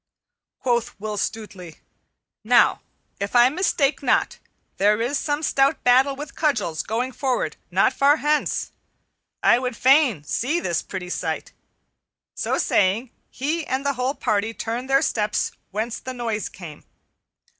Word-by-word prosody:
Quoth 240 -5 -1
Will 215 +1 -4
Stutely, 200 -6 -5 0.6
"Now - - +4 0.4
if 200 +4 -4
I 240 +1 +7
mistake 300 -3 +1
not 265 - +1 0.4
there 210 +2 +3
is 245 +5 0
some 295 0 -2
stout 275 0 +2
battle 260 +3 +4
with 290 +1 -8
cudgels 220 - 0
going 240 +4 -2
forward 260 -1 -1
not - - +3
far 285 +2 +4
hence. 300 0 0 0.7
I 240 - +5
would 250 -2 -4
fain 260 - +4
see 270 - -1
this 170 - -1
pretty 180 -2 -7
sight." - - -3 0.8
So - - -1
saying, 210 +6 +1 0.2
he 310 +5 -2
and 265 +2 -2
the 280 - +1
whole 255 +2 -1
party 215 +2 -1
turned 240 +3 -4
their 270 0 +4
steps 210 -1 0 0.2
whence 220 +3 -3
the 260 0 -7
noise 225 -4 -3
came. 165 -5 -11
245 Hz, 140 wpm, -23 LUFS, 210-275 Hz, 0.8 s, I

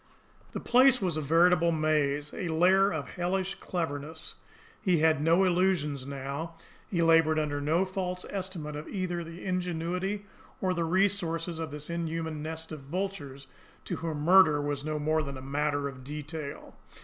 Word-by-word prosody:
The - - -3
place 255 +1 +5
was 180 -5 -1
a 155 - -1
veritable 170 +3 +4
maze, 150 -2 0
a 180 - -3
lair 185 +5 +4
of 155 -4 -3
hellish 185 +2 -1
cleverness. 160 -2 -4 0.5
He 185 -4 +3
had 155 -1 +3
no 165 +4 +4
illusions 175 -7 +1
now, 140 +4 -5 0.3
he 170 -3 +1
laboured 165 -1 +5
under 145 -2 -1
no 160 +6 +2
false 185 -1 -3
estimate 180 -6 -5
of 150 +1 -6
either 180 -3 -3
the 165 +1 -9
ingenuity 180 +2 -2 0.3
or 185 -1 +1
the 170 -2 -1
resources 175 -2 0
of 160 -1 -3
this 150 0 -6
inhuman 165 -2 -3
nest 160 +1 -6
of 155 - -6
vultures 145 -3 -5 0.4
to - - -3
whom 160 -3 -3
murder 165 -3 +6
was 145 -1 -2
no 155 0 -2
more 155 +1 +1
than 140 -2 -5
a - - -8
matter 145 +1 -1
of 130 -2 -9
detail. 150 +1 -6
165 Hz, 160 wpm, -29 LUFS, 150-180 Hz, 0.5 s, murder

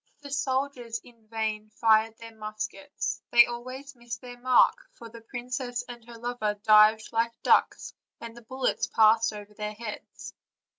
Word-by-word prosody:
" - - -40
The 285 - -9
soldiers 260 -4 -2
in 230 -3 -20
vain 215 -1 -3
fired 220 0 +3
their 230 0 -11
muskets; 215 +7 -5
they 240 0 +8
always 255 +3 -8
missed 240 -1 -7
their 245 -1 -10
mark, 255 0 +5 0.2
for 230 - -12
the 230 0 -12
princess 245 +1 -4
and 240 -1 -10
her 235 -1 -11
lover 230 -3 -2
dived 215 +1 +6
like 230 0 -1
ducks, - - +2 0.3
and 230 0 -9
the 240 - -12
bullets 260 +3 -1
passed 220 +1 +4
over 210 0 -10
their 210 0 -5
heads. 220 -1 -8
230 Hz, 160 wpm, -27 LUFS, 220-245 Hz, 0.3 s, they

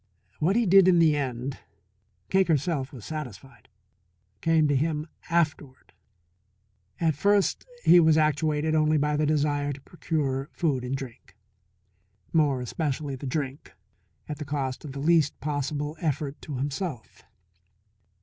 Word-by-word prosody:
What 175 +6 +2
he 235 0 +3
did 195 0 +6
in 180 -2 +5
the 160 -3 +5
end, 130 -1 -3 0.7
Cake 190 0 +3
herself 145 -3 0
was 120 -7 -10
satisfied 135 -6 -8 0.7
came 160 -2 +3
to 145 - +1
him 150 +2 0 0.2
afterward. 150 -5 -1 1.1
At 165 -2 +2
first 200 - +1 0.2
he 175 - +7
was 160 -2 +5
actuated 155 0 +1
only 155 0 +3
by 150 0 +1
the 150 0 +1
desire 145 -1 +1
to 140 0 -8
procure 140 -4 -2
food 140 -7 0
and 125 +2 -2
drink 120 -7 -9 1.0
more 145 -5 +2
especially 145 +1 -3
the 135 +1 -7
drink 140 0 -4 0.5
at 150 0 -6
the - - -3
cost 140 -3 -3
of 145 -3 -7
the 140 - -6
least 155 0 +2
possible 145 +1 -3
effort 150 -3 -2
to 145 -4 -6
himself. 140 - -4
150 Hz, 140 wpm, -26 LUFS, 135-160 Hz, 1.1 s, he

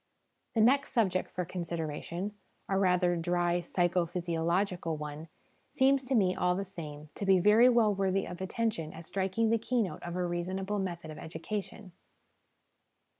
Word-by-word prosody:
The 220 - +4
next 275 +5 +3
subject 190 -7 +1
for 180 - -3
consideration 170 +2 -4 0.3
a 195 - 0
rather 180 -2 +3
dry 175 +1 +1
psycho 175 0 +1
physiological 170 0 -1
one 150 +1 -6 0.4
seems 270 0 +3
to 265 +1 0
me, 190 -5 +3
all 180 0 +1
the 195 +1 -2
same, 150 -5 -8
to - - -6
be 195 -1 +5
very 210 +7 +6
well 230 -4 +4
worthy 195 0 0
of 175 +1 -8
attention 190 -5 -2
as 165 +1 -10
striking 195 +5 0
the 230 - +3
keynote 225 -4 -1
of 175 0 -5
a 180 0 0
reasonable 190 +4 -2
method 170 -4 -4
of 155 - -9
education. 200 +3 -6
185 Hz, 155 wpm, -31 LUFS, 170-205 Hz, 0.4 s, very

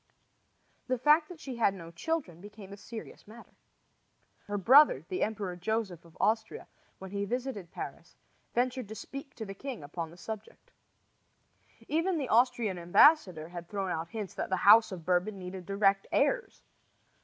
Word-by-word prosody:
The 255 0 0
fact 300 +5 +4
that 355 -3 -10
she 265 -5 -7
had 200 -4 +2
no 165 -3 -10
children 175 - -3
became 205 -1 -11
a - - -7
serious 220 +1 -10
matter. 230 +3 -14 1.0
Her 205 0 -2
brother, 265 +10 +6
the 370 -1 -3
Emperor 205 -4 -2
Joseph 185 -2 -3
of 165 - -18
Austria, 220 +1 0 0.3
when 190 -1 -10
he 200 0 -2
visited 240 -4 -4
Paris, - - -8 0.4
ventured 250 -1 0
to 220 - -8
speak 275 +3 -9
to 220 - -6
the 195 - -7
king 250 - -7
upon 165 +3 -5
the 170 - -15
subject. 220 +3 -9 1.2
Even 330 +4 +1
the 275 -5 -3
Austrian 230 -5 +2
ambassador 175 - +4
had 175 -1 -8
thrown 195 -3 -2
out 165 0 -3
hints 210 -3 -6
that - - -4
the 190 - +1
house 220 +2 +8
of 175 -4 -7
Bourbon 185 +4 +1
needed 185 -1 -8
direct 195 0 +2
heirs. - - 0
205 Hz, 165 wpm, -30 LUFS, 185-250 Hz, 1.2 s, house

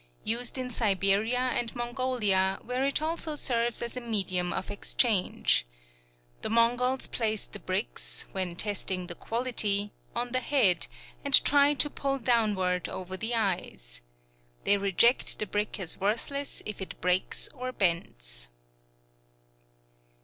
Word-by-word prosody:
Used 240 +4 -2
in 255 -1 -4
Siberia 205 +1 +2 0.2
and 240 0 -1
Mongolia, 240 -6 +1
where 250 +2 -2
it 280 +2 0
also 320 -1 0
serves 240 -4 0
as 235 - -3
a 250 - -4
medium 190 -6 -1
of 190 - -4
exchange. 205 -1 +1 0.8
The - - -3
Mongols 245 +3 +2
place 220 -3 -1
the - - -9
bricks, - - -1
when 185 -3 -3
testing 190 -2 0
the 175 - -5
quality, 210 -2 +1 0.2
on 240 +1 -2
the 255 - +2
head, 235 -9 +3 0.4
and - - +7
try 285 +1 +5
to 280 +2 +3
pull 275 -1 -2
downward 210 -8 +1
over 185 0 -5
the 225 +5 -1
eyes. 180 - -2 0.6
They 205 - +4
reject 200 +6 +3
the 215 - -2
brick 210 +1 -3
as 175 -4 -2
worthless 235 +8 -2
if 210 -2 -6
it 190 - -7
breaks 180 +1 +1
or 255 -2 -5
bends. - - -1
220 Hz, 135 wpm, -28 LUFS, 190-250 Hz, 0.8 s, and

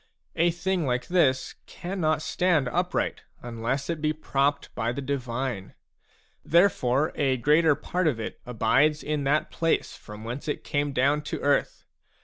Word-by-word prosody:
A 170 +2 +3
thing 175 -1 -1
like 125 0 -1
this 140 -8 +2
cannot 160 -4 -2
stand 170 -6 +1
upright 180 +5 -1 0.2
unless 120 +3 -3
it 165 -3 -3
be 155 0 +1
propped 140 -2 -1
by 115 +3 -1
the 125 - -5
divine. 130 -6 -3 0.7
Therefore, 155 -5 +3
a 135 -2 +1
greater 150 +4 +4
part 180 +3 -1
of 130 -7 0
it 110 - -5
abides 135 +6 +2
in 150 -2 -2
that 150 +3 +1
place 165 -1 0
from 105 0 -11
whence 120 +6 -6
it 150 - -3
came 145 0 -1
down 140 +3 +2
to - - -3
earth. 145 0 0
145 Hz, 150 wpm, -26 LUFS, 125-160 Hz, 0.7 s, greater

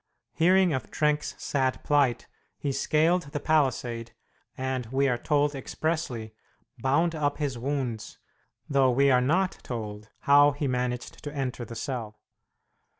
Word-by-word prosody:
Hearing 180 +1 +4
of 130 -3 -3
Trenck's 150 0 0
sad 130 -2 -1
plight, 140 -5 +2 0.3
he 140 - -2
scaled 155 +3 +1
the 145 - -1
palisade, 125 -7 0 0.4
and, 130 -2 -2
we 135 +3 +1
are 125 -2 0
told 145 0 +1
expressly, 135 -5 -3 0.5
bound 155 +7 +2
up 145 -2 -1
his 145 -4 -2
wounds, 125 -3 -3 0.5
though 135 -2 +3
we 135 +2 +4
are 125 -1 +5
not 180 +8 +1
told 105 -3 -6
how 145 +1 +6
he 145 0 -2
managed 125 -1 -3
to 145 - -5
enter 130 -3 -3
the 115 - -9
cell. 115 -4 -5
135 Hz, 140 wpm, -27 LUFS, 125-150 Hz, 0.5 s, how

